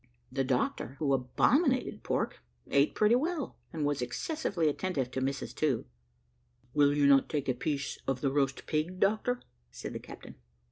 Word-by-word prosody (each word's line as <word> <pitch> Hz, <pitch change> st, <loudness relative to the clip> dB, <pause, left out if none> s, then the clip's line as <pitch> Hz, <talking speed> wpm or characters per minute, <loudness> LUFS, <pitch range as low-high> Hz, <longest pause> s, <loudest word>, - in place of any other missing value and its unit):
The 135 Hz, 0 st, 0 dB
doctor, 130 Hz, 0 st, -1 dB
who 140 Hz, -3 st, +1 dB
abominated 250 Hz, -, +2 dB
pork, -, -, -1 dB, 0.3 s
ate 140 Hz, +1 st, +3 dB
pretty 215 Hz, +1 st, +4 dB
well, 305 Hz, +4 st, 0 dB, 0.2 s
and 155 Hz, -3 st, -2 dB
was 145 Hz, -2 st, 0 dB
excessively 170 Hz, -, -1 dB
attentive 145 Hz, -4 st, -1 dB
to 130 Hz, -, -2 dB
Mrs 135 Hz, +1 st, -2 dB
To. 145 Hz, -6 st, +1 dB, 0.9 s
"Will 145 Hz, -1 st, +4 dB
you 145 Hz, -, +4 dB
not 140 Hz, -1 st, +5 dB
take 145 Hz, -3 st, -2 dB
a 130 Hz, -, +2 dB
piece 140 Hz, +1 st, -3 dB
of 130 Hz, -1 st, 0 dB
the 135 Hz, -, +1 dB
roast 135 Hz, -1 st, 0 dB
pig, 165 Hz, +4 st, -1 dB
doctor?" 220 Hz, +5 st, +1 dB, 0.3 s
said -, -, -7 dB
the -, -, -4 dB
captain. -, -, -11 dB
145 Hz, 160 wpm, -31 LUFS, 135-190 Hz, 0.9 s, not